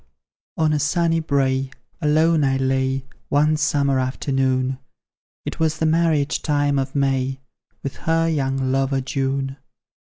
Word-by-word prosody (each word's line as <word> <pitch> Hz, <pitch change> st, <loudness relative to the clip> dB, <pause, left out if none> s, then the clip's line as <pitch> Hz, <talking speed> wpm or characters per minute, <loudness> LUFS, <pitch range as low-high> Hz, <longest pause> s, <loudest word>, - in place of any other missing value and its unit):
On 155 Hz, -1 st, +2 dB
a 150 Hz, -, +1 dB
sunny 165 Hz, +2 st, +1 dB
brae 135 Hz, -3 st, 0 dB, 0.3 s
alone 155 Hz, +1 st, +3 dB
I 135 Hz, -1 st, +2 dB
lay 130 Hz, 0 st, 0 dB, 0.2 s
One 150 Hz, +2 st, +3 dB
summer 140 Hz, -3 st, +1 dB
afternoon; 130 Hz, 0 st, 0 dB, 0.7 s
It -, -, -5 dB
was 160 Hz, -1 st, +1 dB
the 160 Hz, -, 0 dB
marriage 160 Hz, -2 st, +2 dB
time 145 Hz, -2 st, +1 dB
of 135 Hz, +1 st, -3 dB
May, 135 Hz, -1 st, 0 dB, 0.4 s
With 140 Hz, -, -5 dB
her 165 Hz, 0 st, +1 dB
young 135 Hz, -4 st, 0 dB
lover, 135 Hz, 0 st, +1 dB
June. 135 Hz, 0 st, -2 dB
140 Hz, 130 wpm, -22 LUFS, 135-155 Hz, 0.7 s, alone